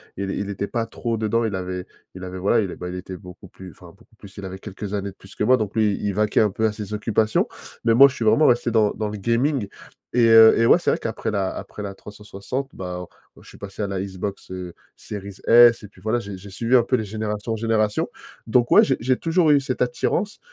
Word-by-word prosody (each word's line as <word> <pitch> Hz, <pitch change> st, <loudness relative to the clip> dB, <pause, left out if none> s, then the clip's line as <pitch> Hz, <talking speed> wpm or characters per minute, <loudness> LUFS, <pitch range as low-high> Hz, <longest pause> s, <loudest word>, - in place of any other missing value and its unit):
il 100 Hz, 0 st, -3 dB
il 100 Hz, 0 st, -3 dB
était 100 Hz, 0 st, -3 dB
pas 115 Hz, +1 st, -2 dB
trop 115 Hz, 0 st, -4 dB
dedans. 110 Hz, +2 st, 0 dB
Il 110 Hz, -3 st, -1 dB
avait 90 Hz, -1 st, -4 dB, 0.3 s
il 95 Hz, -, -9 dB
avait, 95 Hz, 0 st, -6 dB
voilà, 100 Hz, +5 st, +2 dB
il 95 Hz, -4 st, -3 dB
a -, -, -7 dB
bah, 90 Hz, -, -6 dB
il 90 Hz, -, -6 dB
était 90 Hz, 0 st, -7 dB
beaucoup 90 Hz, -2 st, -13 dB
plus- 95 Hz, -1 st, -12 dB
enfin 90 Hz, -, -16 dB
beaucoup 100 Hz, +6 st, -20 dB
plus, 100 Hz, -1 st, -15 dB
il 100 Hz, -, -7 dB
avait 95 Hz, 0 st, -7 dB
quelques 100 Hz, 0 st, -7 dB
années 100 Hz, -1 st, -3 dB
de -, -, -22 dB
plus 95 Hz, -, -16 dB
que -, -, -2 dB
moi- 130 Hz, +4 st, +5 dB
donc 105 Hz, -4 st, -4 dB
lui, 110 Hz, -2 st, +2 dB
il 100 Hz, -1 st, -1 dB
vaquait 105 Hz, +1 st, +1 dB
un 105 Hz, -2 st, +3 dB
peu 110 Hz, +3 st, -1 dB
à -, -, -1 dB
ses 105 Hz, -1 st, -7 dB
occupations. 110 Hz, +1 st, +1 dB, 0.4 s
Mais 115 Hz, -, +3 dB
moi, 135 Hz, +4 st, +9 dB
je 135 Hz, -, -6 dB
suis -, -, -4 dB
vraiment 130 Hz, +8 st, +4 dB
resté 120 Hz, -1 st, +2 dB
dans 110 Hz, -2 st, +3 dB
dans 110 Hz, -1 st, -3 dB
le 105 Hz, -, -6 dB
gaming 115 Hz, +3 st, 0 dB, 0.5 s
et, 120 Hz, -1 st, +4 dB
heu, 115 Hz, 0 st, +8 dB
et 115 Hz, -, +3 dB
ouais, 165 Hz, -, +6 dB
c'est -, -, +1 dB
vrai -, -, +1 dB
qu'après 115 Hz, -1 st, -4 dB
la 100 Hz, -3 st, -1 dB
après 105 Hz, -, -8 dB
la 100 Hz, -1 st, -5 dB
360, 105 Hz, +6 st, -7 dB
bah, 90 Hz, -1 st, -6 dB
on, -, -, -6 dB, 0.4 s
heu, -, -, -18 dB
je -, -, -15 dB
suis -, -, -14 dB
passé 100 Hz, +1 st, -8 dB
à 100 Hz, -, -1 dB
la 95 Hz, -1 st, -3 dB
Xbox, 95 Hz, +1 st, -6 dB
heu, 90 Hz, -2 st, -6 dB, 0.2 s
Series 100 Hz, -1 st, -8 dB
S 120 Hz, 0 st, +6 dB
et 105 Hz, -, -10 dB
puis 100 Hz, -, -21 dB
voilà, 110 Hz, +5 st, -1 dB
j'ai 100 Hz, -4 st, -8 dB
j'ai 100 Hz, +2 st, -12 dB
suivi 115 Hz, +6 st, +2 dB
un 120 Hz, -, +4 dB
peu 125 Hz, -, +1 dB
les 115 Hz, -, -1 dB
générations 105 Hz, +1 st, -4 dB
en -, -, 0 dB
générations. 110 Hz, -1 st, 0 dB, 0.4 s
Donc 120 Hz, +1 st, +2 dB
ouais, -, -, +8 dB
j'ai 135 Hz, -, +1 dB
j'ai 130 Hz, +2 st, +1 dB
toujours 165 Hz, -1 st, +2 dB
eu 145 Hz, -, +5 dB
cette 130 Hz, -2 st, -4 dB
attirance. 170 Hz, -, -1 dB
105 Hz, 265 wpm, -22 LUFS, 95-115 Hz, 0.5 s, moi